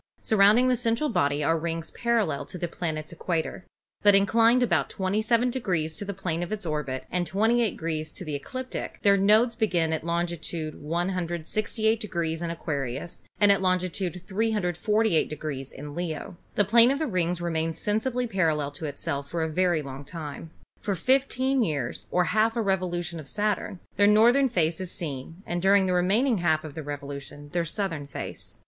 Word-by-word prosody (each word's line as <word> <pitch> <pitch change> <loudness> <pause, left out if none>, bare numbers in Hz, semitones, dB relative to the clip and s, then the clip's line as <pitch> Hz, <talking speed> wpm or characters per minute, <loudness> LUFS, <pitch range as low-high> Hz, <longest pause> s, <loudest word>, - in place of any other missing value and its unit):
Surrounding 215 +4 +5
the 255 - +3
central 235 +5 0
body 145 -6 +1
are 165 +2 +2
rings 165 0 -3
parallel 235 -11 0
to - - -8
the 175 - -2
planet's 160 -1 -4
equator, 170 +1 -3 0.3
but 205 -1 +6
inclined 230 +5 +4
about 175 - +1
27 215 +6 +1
degrees 175 -11 -1
to - - -5
the 200 - -4
plane 180 -4 -3
of 175 - -4
its 215 -3 -3
orbit 150 -4 -2
and 180 -1 0
SATURN - - -13
205 210 +3 +3
28 235 -2 +3
degrees 155 -3 -3
to 185 - -9
the 155 - -4
ecliptic, 255 - -5
their 200 -1 +6
nodes 215 +5 +4
being 175 -8 +1
at 160 - -2
longitude 170 -2 -3
1 170 +5 -1
68° 180 0 -1
in 170 - -2
Aquarius 150 -1 -4 0.2
and 205 -1 +6
at 200 - +3
longitude 185 -1 -1
348 210 -2 +1 0.4
in 145 +1 -7
Leo. 170 +1 -4 0.2
The 205 - +3
plane 230 +4 +6
of 275 - +1
the 315 - -1
rings 180 - 0
remains 165 -1 -1
sensibly 240 +6 0
parallel 160 -9 0
to 145 +3 -7
itself 140 -1 -4
for 170 -1 -1
a 160 - -1
very 175 -1 +1
long 135 0 -7
time. 155 +1 -7 0.3
For 200 -2 -2
fifteen 260 +5 +2
years, 145 - -2
or 180 - +2
half 220 +2 +3
a 235 - +1
revolution 175 -3 -1
of 150 - -9
Sa 210 +5 +1
turn, 190 - -7 0.2
their 205 +1 +5
northern 240 +6 +5
face 170 -5 0
is 185 -1 -3
seen 165 +2 -6
and 175 0 -2
during 195 +1 +5
the 185 - +1
remaining 205 +6 +2
half 160 -2 +2
of 155 -2 -8
the 160 - -5
revolution 145 0 -7
their 170 +2 -1
southern 165 -5 -3
face. - - -6
180 Hz, 180 wpm, -27 LUFS, 160-215 Hz, 0.4 s, but